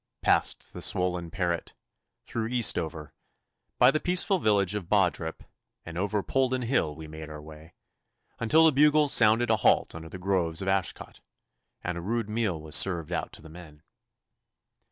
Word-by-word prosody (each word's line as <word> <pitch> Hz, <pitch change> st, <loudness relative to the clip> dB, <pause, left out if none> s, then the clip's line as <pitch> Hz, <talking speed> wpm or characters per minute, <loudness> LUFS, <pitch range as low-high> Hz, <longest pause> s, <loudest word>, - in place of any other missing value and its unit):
Past -, -, +1 dB
the -, -, -8 dB
swollen 90 Hz, -2 st, 0 dB
Parret, 85 Hz, -3 st, -3 dB, 0.5 s
through 115 Hz, -1 st, -3 dB
Eastover, 85 Hz, -, -1 dB, 0.7 s
by 125 Hz, +2 st, +6 dB
the 155 Hz, -, 0 dB
peaceful 180 Hz, +3 st, +1 dB
village 100 Hz, -, +2 dB
of 100 Hz, -5 st, -5 dB
Bawdrip, 80 Hz, 0 st, 0 dB, 0.4 s
and 85 Hz, -, -9 dB
over 100 Hz, +2 st, -1 dB
Polden 130 Hz, -1 st, 0 dB
Hill 115 Hz, -, 0 dB
we 80 Hz, 0 st, -10 dB
made 80 Hz, 0 st, -9 dB
our 75 Hz, -1 st, -8 dB
way, 80 Hz, +2 st, -14 dB, 0.6 s
until 155 Hz, +8 st, +4 dB
the 160 Hz, -, +6 dB
bugles 150 Hz, +1 st, +4 dB
sounded 115 Hz, +1 st, +4 dB
a 110 Hz, -, +3 dB
halt 95 Hz, -, +2 dB
under 80 Hz, 0 st, -9 dB
the 90 Hz, -, -8 dB
groves 90 Hz, -3 st, -1 dB
of 95 Hz, -, -3 dB
Ashcot, 95 Hz, -2 st, -2 dB, 0.6 s
and 90 Hz, -1 st, -3 dB
a -, -, -6 dB
rude 110 Hz, +3 st, -2 dB
meal 110 Hz, -7 st, -1 dB
was 75 Hz, 0 st, -8 dB
served 85 Hz, -5 st, +2 dB
out -, -, -3 dB
to -, -, -12 dB
the -, -, -11 dB
men. 80 Hz, -2 st, -14 dB
95 Hz, 165 wpm, -27 LUFS, 80-115 Hz, 0.7 s, by